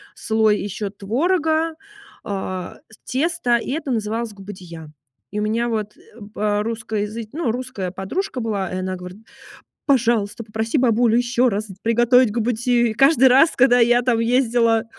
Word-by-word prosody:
слой 220 Hz, -1 st, +1 dB
ещё 205 Hz, 0 st, -4 dB
творога, 315 Hz, -, 0 dB, 0.5 s
а, 185 Hz, -3 st, -5 dB, 0.3 s
тесто, 280 Hz, -3 st, 0 dB
и 235 Hz, -, -5 dB
это 295 Hz, -1 st, -3 dB
называлось 225 Hz, 0 st, -2 dB
губадия. 180 Hz, -6 st, -10 dB, 0.4 s
И 210 Hz, -, -3 dB
у -, -, -1 dB
меня 230 Hz, +3 st, 0 dB
вот, 215 Hz, -2 st, -3 dB
э, -, -, -21 dB, 0.3 s
по 210 Hz, 0 st, 0 dB
русско-языч 220 Hz, -1 st, -4 dB
ну, 295 Hz, -8 st, -1 dB
русская 245 Hz, -7 st, -5 dB
подружка 250 Hz, -, -4 dB
была, 200 Hz, -5 st, -2 dB
и 185 Hz, -, -3 dB
она 185 Hz, 0 st, -3 dB
говорит: 180 Hz, +3 st, -10 dB, 0.7 s
"Пожалуйста, 235 Hz, -4 st, +1 dB
попроси 220 Hz, +5 st, -2 dB
бабулю 235 Hz, -1 st, +3 dB
ещё 245 Hz, 0 st, +2 dB
раз 210 Hz, +2 st, -3 dB
с 190 Hz, -, -11 dB
приготовить 240 Hz, 0 st, +3 dB
губадию". 240 Hz, +1 st, +1 dB
И -, -, -3 dB
каждый 270 Hz, +1 st, +5 dB
раз, 275 Hz, +6 st, +5 dB
когда 245 Hz, -1 st, +4 dB
я 240 Hz, +1 st, +4 dB
там 240 Hz, -2 st, +1 dB
ездила, 230 Hz, -1 st, +2 dB
230 Hz, 150 wpm, -21 LUFS, 210-250 Hz, 0.7 s, каждый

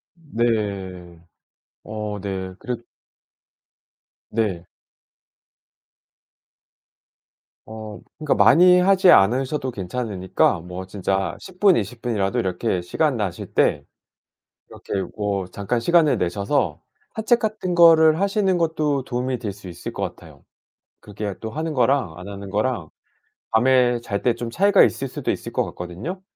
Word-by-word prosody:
네. 100 Hz, -, -3 dB, 0.6 s
어 105 Hz, -1 st, -5 dB
네. 95 Hz, -2 st, -4 dB
그래 125 Hz, -1 st, -3 dB, 1.5 s
네. 100 Hz, -6 st, -2 dB, 3.0 s
어 110 Hz, -1 st, -9 dB, 0.2 s
그러니까 155 Hz, -2 st, 0 dB
많이 180 Hz, +3 st, +6 dB
하지 190 Hz, 0 st, +4 dB
않으셔도 130 Hz, -, +3 dB
괜찮으니까 95 Hz, -3 st, -1 dB
뭐 90 Hz, +2 st, -7 dB
진짜 95 Hz, -1 st, -2 dB
10 185 Hz, -1 st, -13 dB
분, 195 Hz, -3 st, +6 dB
20 115 Hz, +3 st, -4 dB
분이라도 115 Hz, -1 st, -1 dB
이렇게 95 Hz, -1 st, -1 dB
시간 140 Hz, -, 0 dB
나실 100 Hz, -6 st, -4 dB
때 -, -, +2 dB, 0.8 s
이렇게 -, -, -9 dB, 0.2 s
뭐 100 Hz, -2 st, -1 dB
잠깐 100 Hz, +5 st, -3 dB
시간을 170 Hz, 0 st, +3 dB
내셔서 100 Hz, -, -1 dB, 0.3 s
산책 230 Hz, +2 st, +2 dB
같은 215 Hz, -5 st, -2 dB
거를 160 Hz, -1 st, +6 dB
하시는 195 Hz, -2 st, +1 dB
것도 155 Hz, -5 st, 0 dB
도움이 125 Hz, -1 st, -3 dB
될 105 Hz, -4 st, -4 dB
수 100 Hz, -1 st, -12 dB
있을 85 Hz, 0 st, -7 dB
것 -, -, -4 dB
같아요. -, -, -9 dB, 0.6 s
그게 105 Hz, -1 st, -6 dB
또 110 Hz, 0 st, -6 dB
하는 160 Hz, +1 st, -3 dB
거랑 125 Hz, -, +1 dB
안 90 Hz, +2 st, -9 dB
하는 100 Hz, -1 st, -8 dB
거랑 105 Hz, -5 st, -1 dB, 0.6 s
밤에 125 Hz, +1 st, +3 dB
잘 100 Hz, -4 st, -4 dB
때 120 Hz, -, +2 dB
좀 120 Hz, 0 st, -5 dB
차이가 200 Hz, +11 st, +4 dB
있을 135 Hz, -1 st, +2 dB
수도 -, -, -5 dB
있을 -, -, -5 dB
것 -, -, 0 dB
같거든요. 95 Hz, -, -7 dB
115 Hz, 240 characters per minute, -22 LUFS, 95-150 Hz, 3.0 s, 많이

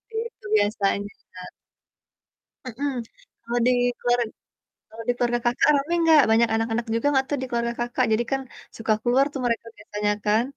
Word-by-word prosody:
Begitu 455 Hz, -, -6 dB
biasanya, 205 Hz, -1 st, 0 dB, 0.2 s
Kak. 180 Hz, 0 st, -9 dB, 1.2 s
Mhm. 275 Hz, +4 st, -3 dB, 0.5 s
Kalau 240 Hz, +1 st, -1 dB
di 250 Hz, -, +5 dB, 0.3 s
keluar 245 Hz, 0 st, +2 dB, 0.7 s
kalau 225 Hz, +1 st, -9 dB
di -, -, +4 dB
keluarga 240 Hz, 0 st, 0 dB
Kakak 240 Hz, +4 st, +3 dB
rame 285 Hz, +4 st, -1 dB
nggak, 320 Hz, -3 st, +7 dB
banyak 230 Hz, +1 st, +4 dB
anak-anak 225 Hz, +1 st, -1 dB
juga 230 Hz, +5 st, 0 dB
nggak 265 Hz, -2 st, +2 dB
tuh 290 Hz, -, 0 dB
di 260 Hz, -, -2 dB
keluarga 235 Hz, 0 st, -1 dB
Kakak, 240 Hz, +1 st, 0 dB
jadi 230 Hz, +2 st, +2 dB
kan 270 Hz, -, 0 dB, 0.4 s
suka 225 Hz, -1 st, +1 dB
keluar 250 Hz, +3 st, +3 dB
tuh 270 Hz, -, -4 dB
mereka 230 Hz, -1 st, -1 dB
biasanya 210 Hz, 0 st, -2 dB
kan? 215 Hz, +2 st, +3 dB
240 Hz, 165 wpm, -24 LUFS, 225-265 Hz, 1.2 s, nggak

